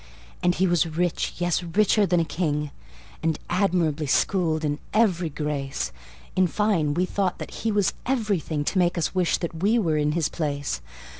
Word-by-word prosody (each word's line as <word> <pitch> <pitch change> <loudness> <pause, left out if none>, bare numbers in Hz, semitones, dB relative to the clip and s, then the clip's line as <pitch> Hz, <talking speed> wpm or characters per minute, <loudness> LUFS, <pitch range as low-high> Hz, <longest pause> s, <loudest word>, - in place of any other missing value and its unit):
And 175 0 +2
he 190 - +2
was 175 -2 +2
rich, 170 +2 -1
yes, 175 0 +1
richer 200 +4 +2
than 175 -1 +3
a 165 - +1
king, 150 -3 -1 0.5
And 160 -1 0
admirably 175 -5 +1
schooled 160 +1 +1
in 145 0 -1 0.2
every 185 -7 +3
grace: 140 - -3 0.4
In 185 -1 +4
fine, 170 -6 +1
we 180 +2 +2
thought 190 -1 -1
that - - -7
he 225 - +1
was 205 -3 +2
everything 200 - 0
To 190 - +1
make 175 0 +2
us 165 - 0
wish 180 -2 +2
that 165 -2 -5
we 215 +5 +3
were 165 -9 +1
in 150 0 +1
his 165 -2 +1
place. 145 -3 -3
170 Hz, 175 wpm, -25 LUFS, 155-185 Hz, 0.5 s, In